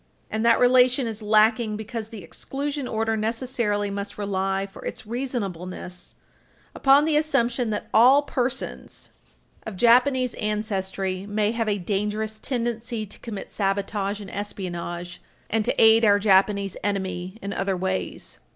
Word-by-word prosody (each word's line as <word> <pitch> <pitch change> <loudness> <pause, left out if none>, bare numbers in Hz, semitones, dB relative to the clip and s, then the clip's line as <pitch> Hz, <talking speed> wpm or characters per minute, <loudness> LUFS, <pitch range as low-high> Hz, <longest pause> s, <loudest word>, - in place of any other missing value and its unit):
And 220 0 -1
that 235 0 +5
relation 250 +1 +5
is 220 -1 -5
lacking 215 +1 +3
because 220 0 -6
the 220 -5 -9
exclusion 280 - -4
order 225 0 0
necessarily 220 -2 -1
must 200 0 -5
rely 195 -1 -1
for 195 - -12
its - - -6
reasonableness 195 -7 -5 0.6
upon 275 +2 +5
the 315 -1 +1
assumption 245 -6 +1
that 210 - -3
all 260 +6 +6
persons 260 -2 -4 0.5
of 220 - -7
Japanese 250 +3 +4
ancestry 195 -3 -2
may 210 +1 +1
have 225 -1 -1
a 205 - +1
dangerous 210 +3 -2
tendency 235 -2 -3
to 205 - -9
commit 210 -4 -7
sabotage 200 0 -1
and 200 -2 -9
espionage 175 -3 -5 0.3
and 220 0 +2
to - - 0
aid 225 +1 +7
our 205 -2 +6
Japanese 200 -1 +3
enemy 190 -1 -3
in 200 -1 -5
other 195 -1 -1
ways. 190 +1 -3
215 Hz, 140 wpm, -24 LUFS, 195-235 Hz, 0.6 s, aid